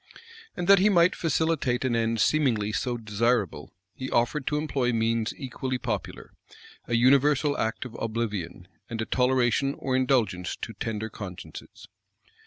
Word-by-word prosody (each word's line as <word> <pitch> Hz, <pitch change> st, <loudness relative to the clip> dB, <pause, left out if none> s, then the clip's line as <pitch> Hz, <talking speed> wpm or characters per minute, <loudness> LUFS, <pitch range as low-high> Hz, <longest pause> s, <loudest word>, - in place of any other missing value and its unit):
And 175 Hz, -1 st, -3 dB
that 200 Hz, -1 st, +7 dB
he 200 Hz, +3 st, +4 dB
might 175 Hz, -2 st, +4 dB
facilitate 160 Hz, -6 st, 0 dB
an 125 Hz, -2 st, +1 dB
end 115 Hz, 0 st, 0 dB
seemingly 115 Hz, -6 st, +2 dB
so 120 Hz, +2 st, -2 dB
desirable, 105 Hz, -7 st, -1 dB, 0.2 s
he 130 Hz, -, -6 dB
offered 120 Hz, +4 st, 0 dB
to 150 Hz, -, +1 dB
employ 140 Hz, -5 st, 0 dB
means 115 Hz, -1 st, 0 dB
equally 130 Hz, -1 st, -4 dB
popular, 115 Hz, -5 st, -5 dB, 0.6 s
a 120 Hz, -, 0 dB
universal 140 Hz, +4 st, +4 dB
act 110 Hz, +3 st, -2 dB
of 125 Hz, -, -9 dB
oblivion, 105 Hz, -6 st, -3 dB, 0.2 s
and 115 Hz, -, -5 dB
a 110 Hz, -, -1 dB
toleration 130 Hz, +2 st, +1 dB
or 130 Hz, -1 st, -2 dB
indulgence 120 Hz, -9 st, +1 dB
to -, -, -7 dB
tender 110 Hz, 0 st, -4 dB
consciences. 95 Hz, -4 st, -9 dB
120 Hz, 145 wpm, -26 LUFS, 110-135 Hz, 0.6 s, that